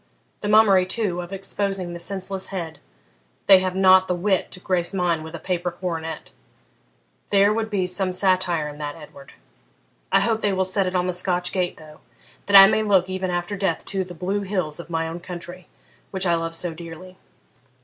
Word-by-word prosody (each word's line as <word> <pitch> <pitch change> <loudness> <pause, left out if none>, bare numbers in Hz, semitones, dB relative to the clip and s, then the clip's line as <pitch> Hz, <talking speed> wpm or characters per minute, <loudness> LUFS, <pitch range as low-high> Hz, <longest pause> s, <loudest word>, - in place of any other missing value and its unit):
The 205 - -4
mummery, 205 -4 +5
too, 185 -4 -1
of 175 +1 -9
exposing 195 -2 -3
the 170 - -6
senseless 190 +1 -3
head 175 -5 -6 0.7
they 195 -2 +8
have 185 0 -2
not 190 0 +5
the 180 - 0
wit 190 +1 0
to - - -8
grace 180 0 -1
mine 175 -3 0
with 160 +1 -8
a - - -7
paper 180 0 -2
coronet; 165 -3 -5 1.0
there 200 +1 +4
would 220 0 -2
be 195 -3 0
some 185 +1 0
satire 185 -4 +1
in 150 0 -9
that, 145 -1 -5
Edward. 140 -3 -14 0.8
I - - +4
hope 225 -1 0
they 205 - +1
will 190 0 +1
set 190 0 0
it 185 - -3
on 180 0 +1
the 180 - -1
Scotch 180 0 0
gate 180 -2 -2
though, 155 -1 -14 0.5
that 200 -1 +8
I 195 - +12
may 215 +2 +2
look, 190 -3 +2
even 185 0 -2
after 175 +3 -2
death, 190 -4 -2
to 195 -2 -2
the 180 -1 -10
blue 195 +4 -2
hills 185 -6 -3
of 170 - -9
my 165 -1 -1
own 165 +2 -6
country, 180 0 -9 0.4
which 190 -1 -2
I 175 - +3
love 165 0 -2
so 170 0 -2
dearly. 170 +3 -11
185 Hz, 200 wpm, -23 LUFS, 170-195 Hz, 1.0 s, I